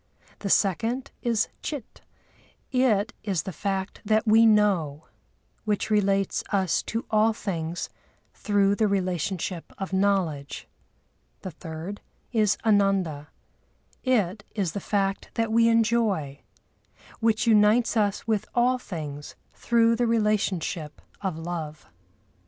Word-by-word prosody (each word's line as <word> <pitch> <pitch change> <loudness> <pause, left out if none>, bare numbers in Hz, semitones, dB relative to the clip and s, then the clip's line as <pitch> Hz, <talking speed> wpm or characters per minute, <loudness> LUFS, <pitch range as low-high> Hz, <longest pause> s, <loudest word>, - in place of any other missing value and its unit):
The 200 - -4
second 225 +8 +1
is 230 -3 +1
Chit; 285 -7 -6 0.7
it 245 -4 +2
is 190 -6 -1
the 190 - -5
fact 195 +2 -3
that 215 +1 +2
we 225 +1 +6
know, 190 -9 +2 0.6
which 215 0 -1
relates 195 -2 +1
us 190 -5 +1
to 225 +1 -2
all 220 +1 +4
things 170 -6 -4 0.5
through 200 -2 +2
the 215 +1 +2
relationship 185 -2 -2
of 195 0 -5
knowledge. 190 -8 0 0.7
The 185 - -6
third 165 +5 -7 0.3
is 215 -4 +2
Ananda: 195 -8 +2 0.8
it 210 -6 +1
is 195 -6 0
the 200 - -4
fact 195 0 -1
that 225 -1 0
we 230 +1 +4
enjoy, 220 -11 +1 0.8
which 225 -1 +2
unites 220 +2 +4
us 205 -2 +1
with 220 -3 0
all 250 +1 +3
things 150 - -7 0.2
through 230 -1 +2
the 240 0 +1
relationship 205 -8 0 0.2
of 190 -5 -2
love. 160 -2 -5
200 Hz, 115 wpm, -26 LUFS, 180-225 Hz, 0.8 s, we